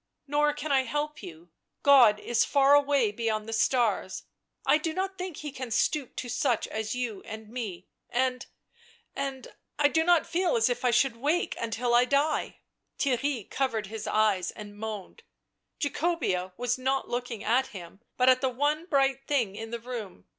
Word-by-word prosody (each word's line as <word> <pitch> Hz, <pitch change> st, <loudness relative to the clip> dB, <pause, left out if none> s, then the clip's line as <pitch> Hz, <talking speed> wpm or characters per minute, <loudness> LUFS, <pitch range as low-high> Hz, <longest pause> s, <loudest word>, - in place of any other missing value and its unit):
Nor 295 Hz, +1 st, +2 dB
can 295 Hz, 0 st, -4 dB
I 270 Hz, -1 st, +5 dB
help 295 Hz, +3 st, -3 dB
you; 170 Hz, -3 st, -11 dB, 0.3 s
God 245 Hz, -7 st, +7 dB
is 240 Hz, +1 st, +1 dB
far 280 Hz, 0 st, +4 dB
away 285 Hz, -6 st, +4 dB
beyond 215 Hz, 0 st, -2 dB
the 225 Hz, -, -4 dB
stars. 225 Hz, -5 st, +1 dB, 0.4 s
I 305 Hz, -, +4 dB
do 315 Hz, 0 st, -3 dB
not 380 Hz, +1 st, -2 dB
think 365 Hz, -4 st, -6 dB
He 300 Hz, -1 st, -6 dB
can 255 Hz, -2 st, -6 dB
stoop 265 Hz, +3 st, 0 dB
to 250 Hz, -, -5 dB
such 240 Hz, -1 st, 0 dB
as 220 Hz, +1 st, -3 dB
you 235 Hz, -6 st, -3 dB
and 220 Hz, 0 st, -9 dB
me 210 Hz, -7 st, -6 dB
— -, -, -56 dB
and 255 Hz, +1 st, -1 dB, 0.4 s
— -, -, -26 dB, 0.3 s
and 270 Hz, -2 st, -5 dB
— -, -, -53 dB
I 290 Hz, -1 st, +4 dB
do 320 Hz, +2 st, +2 dB
not 345 Hz, -1 st, +4 dB
feel 345 Hz, +1 st, 0 dB
as 230 Hz, +2 st, +3 dB
if 245 Hz, 0 st, -2 dB
I 250 Hz, -, +3 dB
should 240 Hz, 0 st, +2 dB
wake 305 Hz, +8 st, 0 dB
until 235 Hz, +1 st, -1 dB
I 240 Hz, +1 st, +6 dB
die 280 Hz, +4 st, 0 dB, 0.2 s
" -, -, -53 dB
Theirry 265 Hz, -4 st, 0 dB
covered 245 Hz, -6 st, -1 dB
his 220 Hz, -, -5 dB
eyes 210 Hz, -5 st, +2 dB
and 205 Hz, -1 st, -9 dB
moaned. 215 Hz, -, -7 dB, 0.6 s
Jacobea 285 Hz, -, -1 dB
was 245 Hz, +1 st, -1 dB
not 265 Hz, +1 st, 0 dB
looking 240 Hz, -2 st, -4 dB
at 250 Hz, +4 st, +2 dB
him, 190 Hz, 0 st, -11 dB, 0.2 s
but 250 Hz, -, +3 dB
at 255 Hz, 0 st, +6 dB
the 265 Hz, -, +2 dB
one 295 Hz, +6 st, -1 dB
bright 270 Hz, -3 st, +1 dB
thing 240 Hz, -9 st, 0 dB
in 225 Hz, +1 st, -6 dB
the 235 Hz, +1 st, -4 dB
room. 225 Hz, -, -7 dB
250 Hz, 190 wpm, -28 LUFS, 220-285 Hz, 0.6 s, God